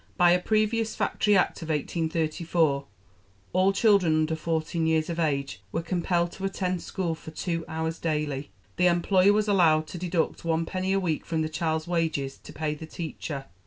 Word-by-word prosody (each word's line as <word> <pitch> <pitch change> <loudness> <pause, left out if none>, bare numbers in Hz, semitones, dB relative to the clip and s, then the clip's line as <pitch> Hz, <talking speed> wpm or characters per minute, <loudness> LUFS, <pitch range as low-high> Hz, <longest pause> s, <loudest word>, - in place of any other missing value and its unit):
By 175 -1 +6
a 180 - +4
previous 215 +3 +1
Factory 210 -2 +2
Act 180 - +1
of 165 - -7
1834 160 -1 0 0.7
all 185 +2 +4
children 195 -6 +4
under 155 0 +1
fourteen 160 +1 -1
years 160 +1 +1
of 170 - -4
age 140 - -1
were 165 - -2
compelled 175 0 0
to 190 - -10
attend 185 -2 -1
school 175 -3 -2
for 160 - -9
two 165 +1 -3
hours 160 0 -3
daily. 150 -3 -2 0.3
The 180 - +4
employer 185 +3 +4
was 210 0 +1
allowed 165 -6 +4
to 175 - -6
deduct 175 -2 -1
one 165 0 0
penny 185 +2 -2
a 195 - +3
week 165 -5 -1
from 160 -1 -1
the 155 - -2
child's 160 0 -1
wages 160 -6 -1
to - - -12
pay 155 -1 -2
the 155 +1 -8
teacher. 155 -4 -5
165 Hz, 180 wpm, -27 LUFS, 155-180 Hz, 0.7 s, By